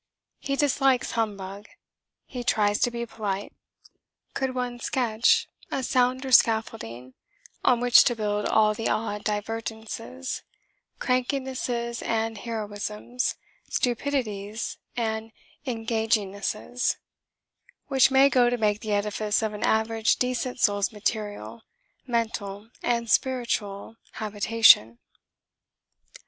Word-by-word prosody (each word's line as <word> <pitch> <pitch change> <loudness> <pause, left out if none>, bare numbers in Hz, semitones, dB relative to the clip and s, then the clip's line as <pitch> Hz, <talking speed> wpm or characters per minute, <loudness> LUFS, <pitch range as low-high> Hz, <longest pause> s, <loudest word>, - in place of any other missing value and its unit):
He 275 - -2
dislikes 270 -3 +2
humbug: 205 -2 -3 0.6
he 250 -2 -6
tries 205 -3 +2
to 245 - +3
be 235 0 -4
polite. 205 -3 -4 0.8
Could 265 -1 -2
one 245 -1 -3
sketch 235 -3 +2 0.2
a 270 - -2
sounder 255 +2 +1
scaffolding 130 - +2 0.5
on 245 -2 +4
which 245 -1 +7
to 240 - +2
build 210 -1 -1
all 215 -1 +4
the 225 +1 -2
odd 210 -1 -2
divergencies 225 +4 -4 0.6
crankinesses 250 -2 -1
and 225 -1 -1
heroisms, 215 +2 -3 0.3
stupidities 230 -5 -2 0.2
and 220 -1 -2 0.4
engagingnesses 225 0 -1 0.9
which 270 -3 +4
may 270 +1 +6
go 250 -3 +4
to 245 - 0
make 210 -2 +1
the 215 -2 -3
edifice 210 +1 0
of 215 -1 -1
an 210 - -7
average 220 0 +2
decent 250 0 -2
soul's 205 -2 +2
material, 215 +1 -3 0.5
mental 225 -3 -3
and 235 -1 0
spiritual 225 -5 0 0.2
habitation? 210 - +4
225 Hz, 105 wpm, -26 LUFS, 210-245 Hz, 0.9 s, which